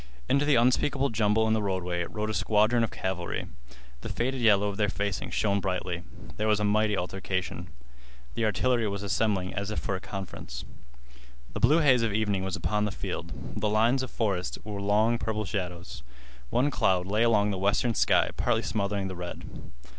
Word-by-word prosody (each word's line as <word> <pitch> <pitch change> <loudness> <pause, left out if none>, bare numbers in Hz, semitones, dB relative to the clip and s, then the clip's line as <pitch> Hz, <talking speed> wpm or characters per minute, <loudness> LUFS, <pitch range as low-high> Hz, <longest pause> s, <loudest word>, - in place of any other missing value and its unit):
Into 140 +1 +3
the 145 -1 +4
unspeakable 130 +3 +2
jumble 110 0 +2
in 110 - +3
the 110 - +1
roadway 90 -3 -1
rode 110 +2 -3
a - - -3
squadron 110 +3 +3
of 115 - 0
cavalry. 90 -2 -3 0.6
The - - -6
faded 130 +1 -1
yellow 105 -3 +4
of 100 -1 -4
their 105 -2 +2
facings 100 -2 -3
shone 100 -1 +2
bravely. 90 -2 -2 0.4
There 110 - 0
was 105 -1 +3
a - - 0
mighty 105 0 +2
altercation. 95 -1 -3 0.7
The 115 - 0
artillery 115 +2 +1
were 100 - -2
assembling 100 -1 0
as 100 0 -3
if 105 - -4
for 100 -4 -1
a - - -3
conference. 95 0 -7 0.9
The - - -3
blue 150 +7 +5
haze 130 -5 +5
of 115 -3 0
evening 105 -3 0
was 95 -2 -2
upon 105 0 0
the 105 - -2
field. 85 -2 -5 0.3
The 105 0 0
lines 115 +5 +3
of 130 - -4
forest 95 -6 -1
were 105 -2 -5
long 110 +3 +2
purple 110 -1 -2
shadows. 90 - -5 0.5
One 135 +4 +2
cloud 90 -7 +2
lay 105 +3 0
along 105 -3 +3
the 95 - -3
western 100 +5 +2
sky - - +3
partly 115 -2 +1
smothering 100 -1 -1
the 95 - -5
red. 90 0 -6
105 Hz, 185 wpm, -28 LUFS, 95-115 Hz, 0.9 s, blue